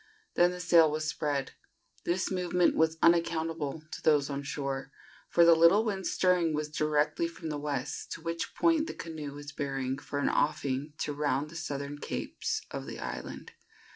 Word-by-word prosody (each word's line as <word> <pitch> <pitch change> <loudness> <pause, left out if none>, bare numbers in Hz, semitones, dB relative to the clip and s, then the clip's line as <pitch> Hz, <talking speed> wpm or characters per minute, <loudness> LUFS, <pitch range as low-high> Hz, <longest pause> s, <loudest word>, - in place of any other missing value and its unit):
Then 175 0 +5
the 180 0 -6
sail 170 -2 +6
was 155 +1 -2
spread. 145 -3 -1 0.5
This 185 +3 0
movement 180 -1 +2
was 160 0 +2
unaccountable 165 -2 +1
to - - -6
those 145 -2 +3
on 140 0 -2
shore, 135 -1 -4 0.4
for 170 - +5
the 170 - +8
little 170 +7 +6
wind 195 -3 -2
stirring 180 -4 +2
was 150 0 -2
directly 155 - +1
from 185 - -7
the 150 -1 -3
west, 145 -1 -4
to - - -8
which 165 0 -4
point 325 -2 +3
the - - -6
canoe 155 -4 -6
was 145 0 -8
bearing 135 -2 -2
for 145 - -5
an 145 - +1
offing 145 -1 0
to 145 - -1
round 145 0 -1
the - - -11
southern 145 -2 -4
capes 440 - -3
of - - -5
the - - -6
island. - - -6
155 Hz, 175 wpm, -30 LUFS, 145-170 Hz, 0.5 s, the